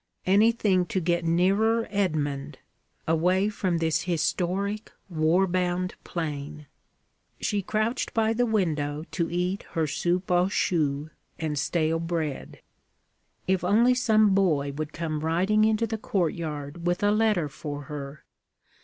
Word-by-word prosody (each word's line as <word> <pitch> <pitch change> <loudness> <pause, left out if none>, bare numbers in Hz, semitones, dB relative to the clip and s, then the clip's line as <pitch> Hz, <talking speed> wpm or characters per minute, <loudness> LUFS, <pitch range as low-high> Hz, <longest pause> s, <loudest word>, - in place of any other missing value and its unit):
Anything 200 -2 +3
to 190 - -1
get 175 0 0
nearer 200 +7 +2
Edmund, 150 -8 -1 0.5
away 180 +5 +2
from 185 -4 -1
this 160 -1 +1
historic, 185 +5 -1 0.2
war 165 +3 +2
bound 180 0 -1
plain! 150 -2 -5 0.7
She 205 -1 0
crouched 215 +5 -1
by 225 0 +1
the 245 +2 +1
window 155 -8 0
to 170 -2 -1
eat 180 +3 -1
her 165 -1 +1
soupe 175 +5 -1
aux 180 +1 +3
choux 150 -6 0 0.3
and 155 -3 -2
stale 160 +1 0
bread. 165 -4 -4 0.8
If 190 -1 +1
only 225 +7 +4
some 215 -5 +3
boy 155 -8 +2
would 155 +2 -5
come 155 -2 -3
riding 185 +7 +2
into 220 +1 +2
the 220 0 -4
courtyard 165 -4 -3
with 175 +2 0
a 205 - +4
letter 210 -6 +2
for 145 0 -6
her! 140 -1 -8
175 Hz, 130 wpm, -26 LUFS, 155-200 Hz, 0.8 s, only